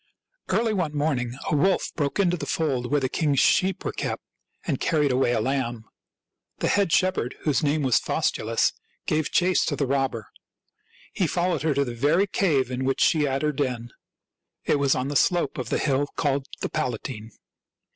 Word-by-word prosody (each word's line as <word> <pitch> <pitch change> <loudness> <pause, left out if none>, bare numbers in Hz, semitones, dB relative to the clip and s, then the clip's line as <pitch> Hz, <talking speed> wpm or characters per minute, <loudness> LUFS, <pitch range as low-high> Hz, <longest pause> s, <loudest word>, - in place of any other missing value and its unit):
Early 225 -1 +1
one 160 -7 -1
morning 130 -5 -1
a - - +2
wolf 185 +6 +2
broke 145 -3 -1
into 180 -3 +2
the - - -6
fold 130 -6 -1
where 145 - +2
the 130 - 0
king's 145 +1 0
sheep 190 +1 +2
were - - -1
kept, - - -4 0.4
and - - -1
carried 150 -5 +1
away 125 -1 +2
a 120 - +1
lamb. 120 -2 -2 0.7
The - - 0
head 200 -4 +2
shepherd, 185 -9 +1
whose 150 -1 +1
oaame 150 0 +1
was 130 - +4
Faustulus, - - 0 0.3
gave 155 -1 0
chase 180 0 +3
to 145 - -1
the 140 - 0
robber. 135 -5 -1 0.8
He 180 - +1
fol 175 +3 0
lowed 165 -6 -1
her 155 -2 +1
to 140 0 +2
the 120 - -5
very 145 +11 +2
cave; 145 -11 +1
in 130 +1 -2
which 135 0 0
she 155 -2 +4
had 135 +1 -1
her 150 - +2
den. 125 -5 -3 0.7
It 145 - +2
was 140 -1 +3
on 130 +2 -2
the 145 - -4
slope 170 -2 +2
of 130 - -4
the - - +1
hill 140 0 +1
called 140 -2 0
the - - -2
Palatine. 115 -2 -4
140 Hz, 190 wpm, -25 LUFS, 130-160 Hz, 0.8 s, was